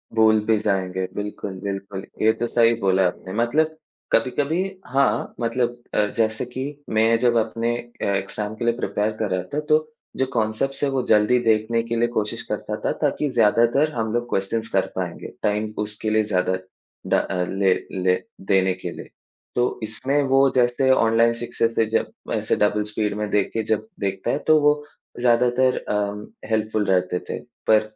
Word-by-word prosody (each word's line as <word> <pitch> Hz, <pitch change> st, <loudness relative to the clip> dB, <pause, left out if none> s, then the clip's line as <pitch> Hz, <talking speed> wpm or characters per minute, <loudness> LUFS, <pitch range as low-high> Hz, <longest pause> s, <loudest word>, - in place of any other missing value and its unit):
भूल 110 Hz, -1 st, +5 dB
भी 110 Hz, 0 st, +3 dB
जाएँगे 95 Hz, -3 st, -1 dB
बिल्कुल, 105 Hz, -1 st, -4 dB
बिल्कुल, 100 Hz, -1 st, -4 dB, 0.2 s
ये 110 Hz, +1 st, +5 dB
तो 120 Hz, +1 st, -2 dB
सही 115 Hz, 0 st, +4 dB
बोला 95 Hz, -1 st, +3 dB
आपने 95 Hz, +1 st, -6 dB
मतलब 150 Hz, +8 st, +1 dB, 0.4 s
कभी-कभी 145 Hz, +8 st, +1 dB, 0.3 s
हाँ, 135 Hz, +2 st, +1 dB
मतलब 120 Hz, +1 st, -1 dB
अ, 105 Hz, -, +3 dB
जैसे 110 Hz, +1 st, +1 dB
कि 125 Hz, +2 st, -5 dB, 0.3 s
मैं 110 Hz, +1 st, +3 dB
जब 120 Hz, -1 st, +3 dB
अपने 115 Hz, +1 st, 0 dB
अ, 120 Hz, 0 st, -7 dB
एग्ज़ाम 105 Hz, +2 st, -3 dB
के 120 Hz, -, -4 dB
लिए 120 Hz, -, +3 dB
प्रिपेयर 105 Hz, -3 st, -1 dB
कर 110 Hz, -2 st, 0 dB
रहा 90 Hz, -1 st, 0 dB
था 150 Hz, -, +1 dB
तो 155 Hz, 0 st, +6 dB, 0.4 s
जो 130 Hz, -, +2 dB
कॉन्सेप्ट्स 115 Hz, +5 st, -1 dB
हैं 140 Hz, -, +3 dB
वो 135 Hz, -1 st, +1 dB
जल्दी 110 Hz, +3 st, +4 dB
देखने 110 Hz, +1 st, +2 dB
के 115 Hz, 0 st, -3 dB
लिए 120 Hz, +1 st, +2 dB
कोशिश 110 Hz, -3 st, -2 dB
करता -, -, -3 dB
था -, -, +2 dB
ताकि 150 Hz, -, +1 dB
ज़्यादातर 120 Hz, +5 st, +3 dB
हम 110 Hz, -2 st, -2 dB
लोग 120 Hz, 0 st, -1 dB
क्वेश्चन्स 110 Hz, +3 st, -1 dB
कर 95 Hz, -, +3 dB
पाएँगे 90 Hz, -2 st, -4 dB, 0.2 s
टाइम 105 Hz, +1 st, 0 dB
उसके 105 Hz, +1 st, -3 dB
लिए 110 Hz, 0 st, +3 dB
ज़्यादा 95 Hz, -3 st, 0 dB, 0.5 s
ड़ -, -, 0 dB
अ, 90 Hz, -2 st, -1 dB
ले 95 Hz, -1 st, +3 dB, 0.3 s
ले 90 Hz, 0 st, +4 dB, 0.3 s
देने 95 Hz, -1 st, +3 dB
के 90 Hz, -1 st, -6 dB
लिए, -, -, -10 dB, 0.5 s
तो 120 Hz, 0 st, 0 dB
इसमें 135 Hz, +7 st, 0 dB
वो 135 Hz, +1 st, +5 dB
जैसे 125 Hz, +2 st, +3 dB
ऑनलाइन 115 Hz, -1 st, +4 dB
सक्सेस 115 Hz, -1 st, -2 dB
है 115 Hz, -, +4 dB
जब -, -, 0 dB, 0.2 s
ऐसे -, -, 0 dB
डबल 105 Hz, 0 st, +2 dB
स्पीड 105 Hz, 0 st, -2 dB
में 105 Hz, 0 st, -2 dB
देख 100 Hz, -1 st, +1 dB
के 115 Hz, -, -1 dB
जब 110 Hz, 0 st, -1 dB
देखता 95 Hz, -1 st, -1 dB
है 145 Hz, -, 0 dB
तो 155 Hz, -1 st, +6 dB
वो 150 Hz, 0 st, +5 dB, 0.5 s
ज़्यादातर 125 Hz, +1 st, +3 dB
अम, 105 Hz, 0 st, -2 dB, 0.2 s
हेल्पफुल 110 Hz, -1 st, 0 dB
रहते 90 Hz, -1 st, +1 dB
थे। -, -, -3 dB, 0.3 s
पर 110 Hz, -1 st, +6 dB
110 Hz, 180 wpm, -23 LUFS, 105-120 Hz, 0.5 s, तो